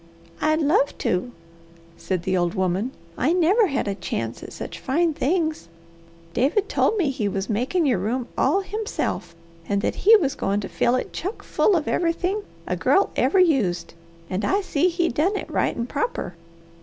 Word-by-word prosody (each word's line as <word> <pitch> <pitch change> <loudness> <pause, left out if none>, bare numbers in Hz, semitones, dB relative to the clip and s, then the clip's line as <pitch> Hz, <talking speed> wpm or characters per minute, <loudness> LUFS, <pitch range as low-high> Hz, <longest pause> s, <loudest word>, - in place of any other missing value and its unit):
"I'd 310 +1 +2
love 285 -1 +2
to!" 185 +7 -1 0.6
said 185 -3 -3
the 185 +1 0
old 175 +2 0
woman. 190 +4 0 0.3
"I 300 +7 +2
never 370 +5 +4
had 275 - -1
a 200 - 0
chance 195 - -4
at - - -9
such - - -7
fine 325 +5 +1
things. 315 - -1 0.7
David 305 - +1
told 440 - +1
me 320 -8 +1
he 240 -6 -2
was 195 +2 -2
makin' 260 - +1
your 250 -9 +2
room 235 +6 -2
all 390 - +2
himself, 385 - -3 0.3
and 200 0 0
that - - +1
he 445 +3 +8
was 295 -11 +2
goin' 200 +1 -1
to 195 - -5
fill 180 +8 +1
it 255 - -3
chuck 390 +6 -5
full 410 - +2
of 310 -3 -1
everythin' 360 +4 0 0.2
a - - -1
girl 395 - +2
ever 390 - +2
used, 260 - +2 0.3
and 185 +3 -3
I 400 +2 +2
see 360 -3 +1
he 345 0 0
done 335 - +1
it - - -6
right - - 0
an' 235 - -1
proper. 455 - -3
285 Hz, 180 wpm, -23 LUFS, -, 0.7 s, he